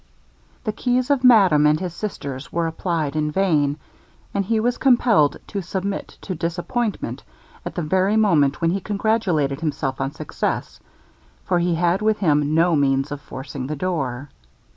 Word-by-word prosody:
The 215 - -1
keys 250 +4 0
of 270 -2 +2
madame 190 -12 +6
and 150 +1 +3
his 180 -2 -4
sisters 140 -9 -6
were 170 0 0
applied 160 -2 -2
in 150 -1 0
vain, 150 -5 +1 0.6
and 200 - 0
he 220 +3 0
was 240 +2 0
compelled 235 - +4
to 200 - -4
submit 190 +2 -4
to 190 - -4
disappointment 175 +7 -3 0.4
at - - -6
the 175 - -2
very 190 +6 +2
moment 155 -10 +3
when 165 0 +2
he 195 +2 -1
congratulated 195 -9 0
himself 145 -4 -2
on 135 +1 -1
success, - - -4 0.7
for 175 - +1
he 175 0 +1
had 175 +3 +1
with 215 0 +2
him 150 -4 +2
no 165 +1 +4
means 135 -1 +1
of 145 -1 -5
forcing 135 -1 -7
the 155 - -3
door. 140 -6 -3
170 Hz, 165 wpm, -22 LUFS, 145-200 Hz, 0.7 s, madame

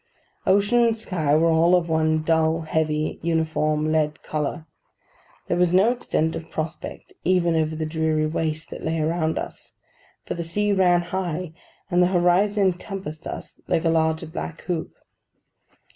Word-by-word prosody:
Ocean 205 +5 +4
and 230 -1 +2
sky 160 -9 0
were 165 +1 +4
all 165 +2 +5
of 175 -2 +1
one 155 -1 +1
dull, 160 0 +2
heavy, 155 -1 -1
uniform, 155 -2 0
lead 155 -1 0
colour. 155 +2 -3 0.8
There 175 - 0
was 180 -1 +3
no 195 +6 +5
extent 160 -9 -1
of 165 - -7
prospect 160 +1 -6
even 175 -2 +2
over 160 0 0
the 155 0 -2
dreary 155 -1 0
waste 155 0 -2
that - - -7
lay 160 0 -1
around 160 0 0
us, - - -7 0.5
for - - -3
the 170 - -4
sea 205 +5 0
ran 180 -2 +4
high, 175 -2 -3 0.4
and 175 0 +4
the 180 - +5
horizon 190 +3 +3
encompassed 185 -3 -3
us - - -8
like 165 - +1
a - - +4
large 160 -1 0
black 165 -2 -5
hoop. 170 -3 -3
165 Hz, 160 wpm, -24 LUFS, 155-180 Hz, 0.8 s, all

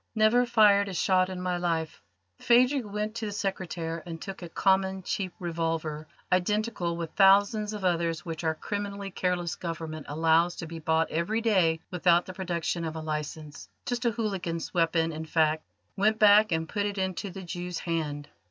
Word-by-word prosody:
"Never 225 +3 +4
fired 205 -4 +5
a 190 - -5
shot 185 +2 +2
in 185 -1 -5
my 180 -1 -1
life." 165 -2 -2 0.4
Phadrig 250 +2 +4
went 210 +1 -3
to 225 -1 -4
the - - -4
secretaire 175 -5 -3
and 165 -2 -7
took 195 +2 -7
a 175 - -7
common, 190 +1 +1
cheap 185 0 -2
revolver, 165 -4 -3 0.2
identical 185 -1 0
with 165 -2 -4
thousands 205 +2 +4
of 205 -3 -4
others 165 -3 0
which 165 -1 -5
our 160 -1 +1
criminally 200 +2 -4
careless 180 -2 -1
Government 160 -2 -6
allows 165 +3 +3
to 165 - -6
be 165 0 -7
bought 160 +1 +1
every 175 +8 0
day 180 -8 +2
without 175 -1 +3
the 185 - -8
production 175 -2 -2
of 160 -1 -4
a - - -4
licence 150 -1 -5 0.2
just 245 0 -2
a - - +5
hooligan's 195 -7 -3
weapon, 165 -1 +2
in 160 0 -5
fact 155 -1 +1 0.3
went 215 +2 +2
back 210 -1 +6
and 160 0 0
put 205 +3 -1
it 200 0 -5
into 190 +1 -2
the 190 +1 -8
Jew's 175 0 -5
hand. 150 -4 -3
180 Hz, 180 wpm, -28 LUFS, 165-200 Hz, 0.4 s, back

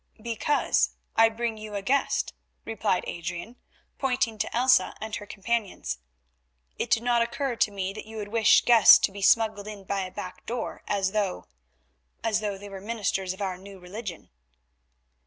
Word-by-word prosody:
"Because 235 +6 +1 0.2
I 225 0 +6
bring 225 -1 -3
you 215 -1 -7
a 200 - -3
guest," 275 +6 +1 0.3
replied 215 -4 0
Adrian 175 +8 -6 0.4
pointing 250 -4 0
to - - -2
Elsa 255 +1 +4
and 220 0 -4
her 205 - -10
companions. 205 - -2 0.8
"It - - -2
did 225 - +3
not 240 -1 +3
occur 235 +2 -1
to - - +3
me 195 -1 -3
that 215 - -9
you 220 0 -9
would 205 -1 -5
wish 225 0 +5
guests 230 -4 +9
to - - 0
be 200 0 -8
smuggled 215 0 +3
in 210 -2 -8
by 195 +1 -2
a 185 - -4
back 185 -2 -8
door 235 0 -4
as 195 -2 0
though—as 65 - -4
though 205 -2 -3
they 205 +1 -10
were 195 -1 -8
ministers 200 -3 -2
of 190 +2 -5
our 185 -2 -3
New 195 +1 -11
Religion." 185 - -8
210 Hz, 170 wpm, -27 LUFS, 190-230 Hz, 0.8 s, guests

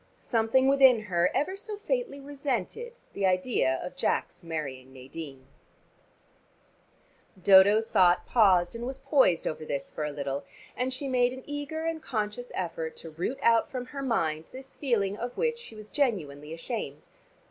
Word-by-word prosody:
Something 235 +3 +2
within 270 -3 +6
her 180 -3 +1
ever 370 +6 0
so 415 +1 -6
faintly 475 - -2
resented 290 - -4 0.2
the 195 -1 +1
idea 185 - +1
of 180 - -7
Jack's 180 - -1
marrying 140 -6 -5
Nadine. 135 +1 -9 1.9
Dodo's 200 +4 +7
thought 180 -4 +4
paused 185 -7 +4
and 235 +1 -5
was 265 0 -5
poised 265 - +3
over 155 - -3
this 140 -2 -4
for 155 - -4
a 150 - -1
little, 140 -1 -3 0.3
and 255 +1 -1
she 265 +2 -3
made 250 -1 +2
an 260 0 -9
eager 290 +2 -4
and 330 -1 -1
a - - -27
conscious 225 -2 -3
effort 165 -3 -3
to 165 - -9
root 180 +12 -3
out 230 -1 +4
from 255 -2 -4
her 275 +2 -7
mind 165 - 0
this 265 +6 -11
feeling 210 -8 0
of 240 +2 -5
which 470 0 0
she 470 - -11
was 215 -1 -10
genuinely 165 - -1
ashamed. 165 - -5
220 Hz, 160 wpm, -28 LUFS, 165-270 Hz, 1.9 s, Dodo's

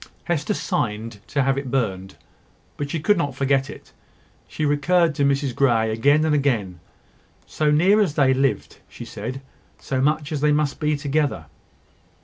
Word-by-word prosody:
Hester 175 +4 -1
signed 110 -4 -3
to 140 -2 0
have 135 +1 +1
it 140 -2 -6
burned; 95 -8 -2 0.6
but 145 -1 -4
she 165 - -2
could 180 +5 +2
not 145 -5 -2
forget 135 0 +1
it. - - -12 0.5
She 155 - -3
recurred 165 +3 +2
to 140 - -1
Mrs 140 -1 +1
Grey, 115 -4 +2
again 145 +8 +3
and 155 - +1
again. 115 -11 0 0.7
"So 155 -1 -1
near 185 +8 +4
as 170 -8 0
they 135 -2 +4
lived," 135 +1 -1
she - - -10
said 125 +6 -6 0.4
"so 130 -1 -3
much 150 +1 0
as 150 -2 -2
they 150 0 +3
must 150 -1 0
be 150 -1 0
together." 145 - -1
140 Hz, 165 wpm, -22 LUFS, 130-150 Hz, 0.7 s, near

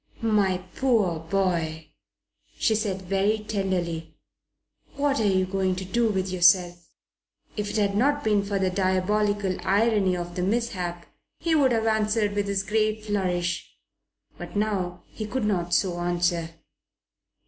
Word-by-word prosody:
"My 205 -4 +2 0.2
poor 215 -11 +2
boy!" 165 -3 -1 0.7
she 225 - +2
said 205 -3 -2
very 195 +3 +1
tenderly. 185 -6 -3 0.8
"What 280 0 +1
are 215 - +2
you 185 -1 +2
going 190 0 0
to 185 +1 -5
do 230 +4 +1
with 190 -2 -1
yourself?" 175 -1 +3 0.7
If 210 -1 -3
it - - -5
had 200 -2 +1
not 285 +6 +2
been 210 -2 +3
for 200 0 -2
the 190 -1 +1
diabolical 195 +1 +1
irony 195 -1 +2
of 175 0 -5
the 180 - -3
mishap 185 -4 -2 0.3
he 335 - 0
would 280 -5 +4
have 225 -1 +1
answered 215 -1 +1
with 205 0 -1
his 200 -1 0
gay 215 +2 0
flourish. 180 -5 -2 0.6
But - - -8
now 190 -4 -1
he 215 - -7
could 250 0 -2
not 175 -4 0
so 175 0 +1
answer. 175 -1 0
195 Hz, 145 wpm, -25 LUFS, 180-215 Hz, 0.8 s, would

